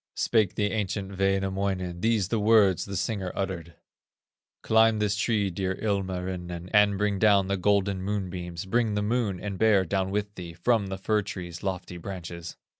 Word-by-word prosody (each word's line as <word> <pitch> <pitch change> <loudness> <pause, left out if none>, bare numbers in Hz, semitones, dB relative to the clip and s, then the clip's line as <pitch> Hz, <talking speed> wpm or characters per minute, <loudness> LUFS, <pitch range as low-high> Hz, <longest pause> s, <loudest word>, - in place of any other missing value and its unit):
Spake 110 -5 +2
the 105 -1 0
ancient 100 -2 -3
Wainamoinen:, 95 -2 0
These 110 -3 +1
the 115 - 0
words 105 -4 +4
the 100 - -6
singer 95 0 -2
uttered: 85 -4 -4 0.9
"Climb 110 0 +4
this 105 -1 +1
tree, 105 -2 +1
dear 95 +1 -2
Ilmarinen, 90 -3 -3
And 105 -1 +5
bring 105 -1 0
down 100 -2 +4
the 100 - +1
golden 100 0 +1
moonbeams, 90 -3 -4
Bring 110 +1 +1
the 105 - 0
Moon 105 -4 0
and 100 -2 -5
Bear 105 -4 +4
down 95 +1 -1
with 105 +1 -2
thee 85 -4 -8
From 110 +3 +1
the 95 0 -4
fir 105 +2 +1
tree's 90 -4 -7
lofty 90 -2 -4
branches." 85 -2 -7
100 Hz, 165 wpm, -27 LUFS, 90-105 Hz, 0.9 s, And